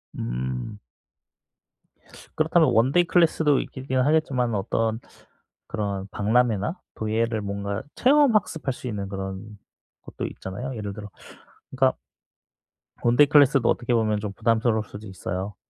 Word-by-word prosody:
음. 65 - -4 1.6
그렇다면 160 +1 +3
원데이 135 +10 +4
클래스도 160 -4 +3
있긴 130 -1 -3
하겠지만은 130 -5 +1
어떤 110 +2 -1 0.7
그런 100 -2 -3
박람회나 115 - +1 0.2
도예를 110 0 -1
뭔가 100 0 -4
체험 275 -3 +4
학습할 160 -9 0
수 125 - -8
있는 100 -4 -4
그런 95 0 -5 0.6
곳도 - - -6
있잖아요. 125 +8 -6
예를 105 -2 -5
들어 105 0 -9 0.6
그니까 130 0 +2 1.1
원데이 120 +5 +5
클래스도 140 -4 +5
어떻게 120 0 0
보면 110 -2 +1
좀 105 -1 -5
부담스러울 115 0 +1
수도 105 +2 -10
있어요. 95 +1 -5
115 Hz, 300 characters per minute, -24 LUFS, 100-135 Hz, 1.6 s, 원데이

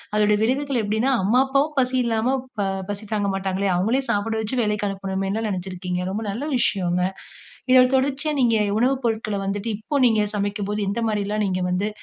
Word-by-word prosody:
அதோடய 210 0 +3
விளைவுகள் 265 +3 +1
எப்டின்னா 220 +6 0
"அம்மா, 235 +6 +3
அப்பாவும் 280 +3 +1
பசி 255 0 +1
இல்லாம, 235 +3 +1 0.3
ஆ - - 0 0.2
பசி 205 +1 -4
தாங்க 205 -2 0
மாட்டாங்களே 195 0 -1
அவங்களையும் 235 +9 +1
சாப்ட 220 +1 0
வைச்சு 225 +4 -2
வேலைக்கு 210 -1 0
அனுப்பனுமேனுல 195 +2 -2
நினச்சுருக்கீங்க." 180 -1 -3
ரொம்ப 215 +3 -3
நல்ல 235 +8 -4
விஷயங்க. 180 -6 +1 0.7
இதோட 255 -1 +8
தொடர்ச்சியா 285 +3 0
நீங்க 230 -3 +3 0.2
உணவு 260 +3 +3
பொருட்கள 215 -2 -1
வந்துட்டு 205 +3 -2
இப்போ 280 +6 -2
நீங்க 220 -2 +3
சமைக்கும்போது, 205 +1 -2
எந்த 230 +3 -2
மாரிலாம் 210 0 -1
நீங்க 185 -1 -1
வந்து 190 +3 0
215 Hz, 165 wpm, -23 LUFS, 200-245 Hz, 0.7 s, இதோட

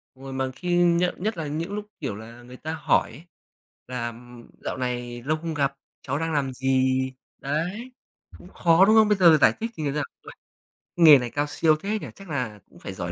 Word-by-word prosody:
Đúng 135 - -16
rồi, 135 -1 -7
mà 130 0 -2
khi 175 -1 -1
nhận 175 +1 +2
nhất 220 -3 -1
là 155 -2 -3
những 165 +7 -4
lúc, 210 0 -4
kiểu 135 -10 -4
là, 115 +3 -11
người 125 +1 -12
ta 155 +1 -5
hỏi 155 - +1
ấy 135 +8 -12 0.7
là, 125 -2 -3
ừm, 120 0 -11
"Dạo - - -3
này 120 -1 -4
lâu 155 +3 0
không 165 0 -5
gặp, 140 -2 0 0.3
cháu 140 +2 -3
đang 165 -1 -2
làm 135 -3 0
gì?" 130 0 +1 0.3
Đấy, 180 - -3 0.5
cũng - - -15
khó, 170 +2 +4
đúng 215 +2 +5
không? 220 -1 +6
Bây 210 -2 +2
giờ 175 -3 +7
là 155 - +6
giải - - +5
thích 230 +1 -3
như 145 -3 -1
nào? 150 0 -1 0.2
"Uầy. - - -11 0.6
Nghề 160 -4 +9
này 120 -1 -4
cao 145 +3 -1
siêu 155 +1 +2
thế 210 +2 -2
nhỉ? - - -7
Chắc 195 -3 -13
là 125 -8 -3
cũng 85 - -18
phải 95 - -7
giỏi 85 -2 -5
145 Hz, 230 wpm, -25 LUFS, 125-170 Hz, 0.7 s, Nghề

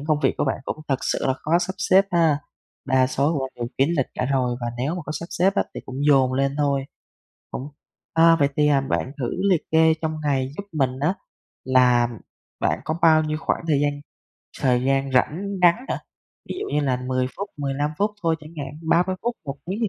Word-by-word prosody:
những 145 - -8
công 155 -2 +2
việc - - +2
của - - +2
bạn 135 - -1
cũng - - -3
thật 135 - +2
sự - - -1
là 130 - +3
khó 165 +5 +1
sắp 180 +1 -2
xếp 190 0 +4
ha? 165 -4 +3 0.5
Đa 130 0 +3
số 140 +4 +1
của - - 0
bạn 130 - -6
đều 120 -1 -3
kín 135 - +4
lịch 135 - +1
cả 125 - -1
rồi, 125 -2 0
và 120 - -3
nếu 140 +6 -1
mà 180 - -4
có 155 - -4
sắp 170 - -5
xếp 195 +3 +2
á - - +3
thì - - -5
cũng 130 - -7
dồn 135 -3 +4
lên 135 +1 0
thôi, 140 -2 +1 0.7
cũng 140 - -5 0.5
à, 165 0 +6
vậy 140 - +4
thì, 150 0 +4
à, 140 -2 +4
bạn 135 0 -2
thử 120 -3 -2 0.2
liệt 175 -5 +3
kê 160 0 +5
trong 155 0 -1
ngày 135 -3 0
giúp 200 - -4
mình 130 -4 0
á 160 +6 +1 0.5
là 125 -2 +4 0.5
bạn - - 0
có 155 - -1
bao 160 -1 +6
nhiêu 155 0 -2
khoảng - - -1
thời 145 -2 +3
gian 145 0 +2 0.7
thời 125 -3 +2
gian 135 0 +1
rảnh 150 +8 +1 0.2
ngắn 175 -1 +7
hả? - - -1 0.5
Ví - - -3
dụ - - -3
như 150 - +3
là 130 -3 +1
10 130 0 +1
phút, 200 +1 -5
15 145 +1 -1
phút 205 +1 +2
thôi 165 -1 +2
chẳng 155 - -12
hạn, 145 +3 -10
30 180 +3 +2
phút, 240 0 -1
1 140 -1 -5
tiếng 195 +4 -3
thì 220 - +2
145 Hz, 230 wpm, -23 LUFS, 130-165 Hz, 0.7 s, ngắn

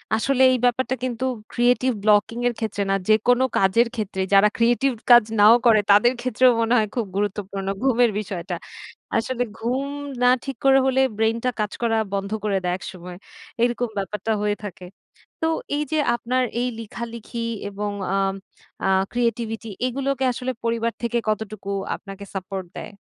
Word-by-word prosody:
আসলে 260 +4 +1
এই 255 - +2
ব্যাপারটা 255 +1 +1
কিন্তু, 255 0 -2 0.3
ক্রিয়েটিভ 250 +1 +2
ব্লকিং 210 +2 +3
এর 245 - 0
ক্ষেত্রে 215 -3 -2
না। 195 - +3
যেকোনো 240 +4 +4
কাজের 195 +5 +3
ক্ষেত্রে, 205 -4 -3
যারা 200 +1 +7
ক্রিয়েটিভ 240 +4 +2 0.2
কাজ 240 -1 +9 0.2
নাও 215 +3 +8
করে, 225 -2 +6
তাদের 210 +5 +5
ক্ষেত্রেও 255 0 +4
মনে 230 +1 +1
হয় 215 -2 +2
খুব 235 -3 0
গুরুত্বপূর্ণ, 200 -1 -3 0.2
ঘুমের 245 -3 +3
বিষয়টা। 190 -4 -5 0.6
আসলে 245 +2 -1 0.2
ঘুম 250 +4 -1 0.4
না 250 - +5 0.2
ঠিক 275 - -5
করে 270 0 +6
হলে, 265 0 +3 0.2
ব্রেইনটা 225 +3 +1
কাজ 210 0 -1
করা 225 -1 +1 0.2
বন্ধ 200 +1 -2
করে 205 -2 +1
দেয় 180 0 0
একসময়। 180 -1 -9 0.5
এরকম 240 0 0
ব্যাপারটা 210 +2 -3
হয়ে 210 0 0
থাকে। 185 -3 -8 0.6
তো, 320 - +2 0.3
এইযে 300 +1 -1 0.2
আপনার 255 +2 0 0.2
এই 250 - 0
লিখালিখি 235 +1 -6 0.2
এবং 205 +1 -4 0.3
আম 195 0 +1 0.5
আ - - +2 0.2
ক্রিয়েটিভিটি 230 -2 -2 0.2
এগুলোকে 270 +1 -1
আসলে 255 +1 -3
পরিবার 230 0 0
থেকে, 235 0 0
কতটুকু 215 -2 -3 0.3
আপনাকে 195 0 -10
সাপোর্ট 190 0 -5
দেয়? - - -8
230 Hz, 155 wpm, -23 LUFS, 205-245 Hz, 0.6 s, কাজ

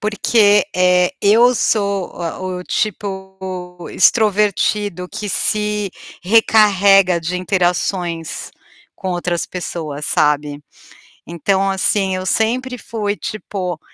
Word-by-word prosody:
Porque, 210 -1 +3
eh, 180 +3 +3
eu 230 +5 +5
sou 200 -4 0
o 180 +2 -4
o - - -10
tipo, 190 -3 -5
extrovertido 205 -2 +1
que 210 - -6
se 210 0 -1 0.3
recarrega 195 -3 +4
de 175 +3 -3
interações 180 -2 -2 0.5
com 190 - -5
outras 175 -1 -2
pessoas, 155 -5 -5
sabe. 150 -1 0 0.6
Então 190 +4 0
assim, 190 0 +1
eu 185 - -5
sempre 250 +4 0
fui 210 -3 -3
tipo, 185 -6 -5
190 Hz, 100 wpm, -18 LUFS, 180-210 Hz, 0.6 s, eu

